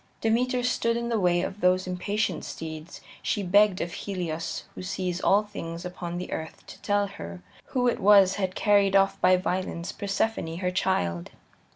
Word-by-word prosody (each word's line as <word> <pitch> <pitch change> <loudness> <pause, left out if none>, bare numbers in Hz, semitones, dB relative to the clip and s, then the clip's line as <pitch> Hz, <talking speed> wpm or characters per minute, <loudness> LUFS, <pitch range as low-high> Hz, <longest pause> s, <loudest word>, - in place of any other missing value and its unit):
Demeter 245 +3 +1
stood 230 -2 +1
in 235 0 -3
the 230 -2 +1
way 175 -2 +2
of 195 +2 -5
those 185 +1 +3
impatient 185 0 -2
steeds; 160 0 -7 0.2
she 205 - -1
begged 200 +1 +4
of 170 0 -3
Helios 170 -5 -4
who - - -8
sees 185 -1 -3
all 205 +2 +4
things 170 -4 -7
upon 175 -1 -5
the 180 - -6
earth 160 0 -6
to - - -12
tell 205 -1 +1
her 85 - -9 0.2
who 250 -1 0
it 240 - +1
was 195 -1 +6
had 190 -2 -2
carried 200 -2 +3
off 195 0 +3
by 185 0 +5
violence, 180 -1 -2
Persephone, 200 -4 -2
her 180 0 -1
child. 85 - 0
185 Hz, 175 wpm, -27 LUFS, 175-205 Hz, 0.2 s, was